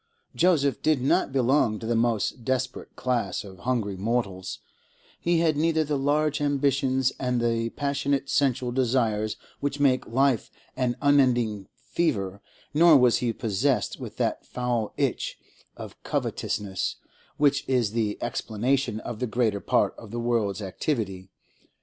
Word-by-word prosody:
Joseph 160 -6 +2
did 155 -3 +2
not 130 +1 +2
belong 130 -3 +2
to 110 - -8
the 120 - 0
most 115 0 0
desperate 130 +1 -2
class 120 -7 -1
of 95 -3 -12
hungry 115 -4 -1
mortals; 100 -2 -2 0.6
he 170 -1 +2
had 160 -2 +2
neither 160 +1 +2
the 150 -1 -1
large 145 +2 +1
ambitions 135 -2 +1
and 125 -1 0
the 115 -1 0
passionate 140 +1 -1
sensual 130 -3 +1
desires 115 -4 0 0.2
which 145 0 -2
make 130 -3 +2
life 130 -1 +1 0.3
an 125 -2 0
unending 120 -8 +3
fever, 100 - -2 0.3
nor 160 0 +7
was 125 -3 +4
he 120 -2 0
possessed 115 0 0
with - - -8
that - - -1
foul 120 -3 -2
itch - - -1 0.4
of - - -10
covetousness 95 -3 -2 0.4
which 140 -2 +3
is 125 -6 +2
the 110 -2 -1
explanation 120 +1 -1
of 115 -3 -6
the 125 - -1
greater 110 -3 0
part - - +2
of 115 - -11
the 120 +3 -4
world's 110 -4 0
activity. 95 -3 -3
125 Hz, 140 wpm, -26 LUFS, 110-140 Hz, 0.6 s, nor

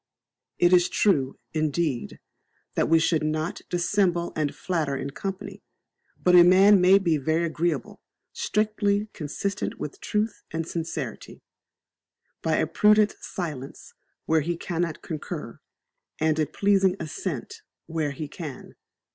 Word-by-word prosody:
It 175 +1 +4
is 175 -1 +5
true, 140 -11 +1 0.2
indeed, 155 -4 -1 0.5
that - - +1
we 165 - +6
should 160 0 +2
not 155 +2 -2
dissembie 175 -1 +1
and 150 -2 -1
flatter 160 -6 -1
in 140 +1 -4
company; 195 +4 -6 0.6
but 180 - +3
a 175 -1 +9
man 190 +2 +6
may 185 +2 +7
be 170 -5 +1
very 160 +4 0
agreeable, 165 -5 -2 0.3
strictly, 210 -1 0
consistent 185 +6 -3
with 145 - -6
truth 215 +1 -1
and 165 0 -3
sincerity, 165 -1 -5 1.0
by - - +1
a - - +2
prudent 210 0 +4
silence 150 -7 -6 0.3
where 160 0 +3
he 170 +3 -2
cannot 170 -2 -3
concur, 155 -3 -6 0.6
and 155 0 +1
a 155 - +2
pleasing 195 +3 +2
assent 155 -3 -5 0.2
where 160 -2 -2
he 145 +2 -5
can. 150 -3 -8
170 Hz, 130 wpm, -26 LUFS, 155-190 Hz, 1.0 s, a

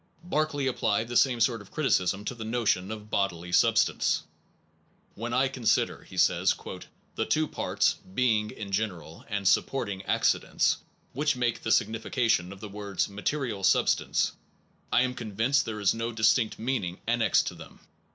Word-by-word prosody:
1 175 - -14
Berkeley 150 -2 0
applied 110 -4 0
the 120 - -6
same 125 -1 +4
sort 115 -1 +2
of 100 - -15
criticism 100 - 0
to - - -2
the 115 -2 -7
notion 110 -5 0
of 105 -1 -8
bodily 90 -3 -1
substance. - - +3 0.9
When - - -5
I - - +3
consider, - - 0
he - - -12
says, - - +3 0.6
the - - -1
two 155 0 +1
parts - - 0 0.2
("being" 110 -4 +2
in 100 -2 -8
general, 95 -6 -3
and 100 -2 -1
"supporting 100 -3 +1
accidents") - - +2 0.4
which 150 +2 +1
make 120 -2 -1
the 110 - -2
signification 110 -4 +1
of 100 0 -11
the 105 - -7
words 100 -1 -3
"material 105 +1 -3
substance," 95 - +2 0.6
I 125 - +4
am 130 -1 -1
convinced 120 +5 0
there 110 -1 -4
is 100 - +3
no 115 +1 -3
distinct 110 0 +2
meaning 110 -7 -2
annexed 120 0 +3
to - - -10
them. - - -13
110 Hz, 160 wpm, -28 LUFS, 100-125 Hz, 0.9 s, same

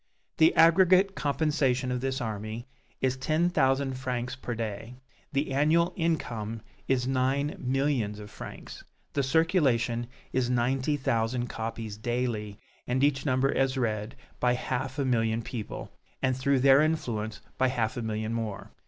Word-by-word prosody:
The 160 0 +5
aggregate 185 +3 +6
compensation 140 -5 +1
of 125 -1 -1
this 130 0 -1
army 110 +1 -4 0.4
is 130 -1 +2
ten 160 +6 +1
thousand 135 -3 +1
francs 125 -1 -3
per 125 -2 -5
day, 110 +1 -5 0.4
the 140 -1 -1
annual 155 +5 +3
income 115 - -2 0.3
is 130 -2 +1
nine 135 +2 +1
millions 130 -5 0
of 105 0 -10
francs, - - -9 0.3
the 140 - +1
circulation 135 -6 +2 0.3
is 125 -2 +1
ninety 130 +4 +1
thousand 120 -1 0
copies 110 -2 -5
daily, 110 -3 -2 0.3
and 130 +2 +1
each 140 0 +2
number 130 +1 +2
is 135 0 +1
read 110 -3 -1 0.2
by 125 0 +3
half 130 +2 -3
a 140 - 0
million 115 -2 +1
people, 110 -2 -6 0.3
and 130 -1 +1
through 130 0 +2
their 135 +1 +7
influence 110 -9 -1 0.2
by 130 - +4
half 115 -4 -1
a 120 - -3
million 110 0 -2
more. 110 -3 -4
130 Hz, 145 wpm, -28 LUFS, 115-140 Hz, 0.4 s, their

